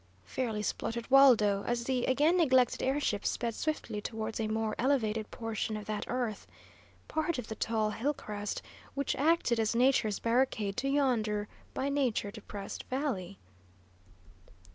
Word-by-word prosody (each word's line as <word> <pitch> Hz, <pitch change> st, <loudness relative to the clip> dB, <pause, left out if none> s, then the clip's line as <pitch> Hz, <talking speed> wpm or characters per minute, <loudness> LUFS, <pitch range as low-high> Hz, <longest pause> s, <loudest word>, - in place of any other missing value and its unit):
fairly 215 Hz, -, -2 dB
spluttered 230 Hz, +2 st, -3 dB
Waldo, 220 Hz, -8 st, +6 dB
as 240 Hz, 0 st, 0 dB
the 255 Hz, 0 st, 0 dB
again 295 Hz, +6 st, +3 dB
neglected 260 Hz, -8 st, +3 dB
air 270 Hz, +2 st, +1 dB
ship 210 Hz, -8 st, -1 dB
sped 235 Hz, -1 st, -1 dB
swiftly 235 Hz, -7 st, -3 dB
towards 220 Hz, 0 st, -4 dB
a 220 Hz, -, 0 dB
more 220 Hz, 0 st, -1 dB
elevated 225 Hz, -5 st, +1 dB
portion 225 Hz, -1 st, -3 dB
of 210 Hz, -, -7 dB
that 210 Hz, -1 st, -3 dB
earth, 240 Hz, -5 st, -2 dB, 0.6 s
part 315 Hz, 0 st, -1 dB
of 250 Hz, -, -4 dB
the -, -, -2 dB
tall 215 Hz, -1 st, 0 dB
hill 255 Hz, +7 st, 0 dB
crest 205 Hz, -3 st, -5 dB, 0.3 s
which 280 Hz, 0 st, 0 dB
acted 295 Hz, -5 st, +2 dB
as 220 Hz, +1 st, +1 dB
nature's 240 Hz, -4 st, +3 dB
barricade 230 Hz, -4 st, +1 dB
to 275 Hz, -, -1 dB
yonder 225 Hz, -7 st, +1 dB, 0.3 s
by 270 Hz, -, -1 dB
nature 260 Hz, -7 st, 0 dB
depressed 205 Hz, -2 st, -7 dB
valley. 240 Hz, -9 st, -3 dB
230 Hz, 145 wpm, -31 LUFS, 215-265 Hz, 0.6 s, Waldo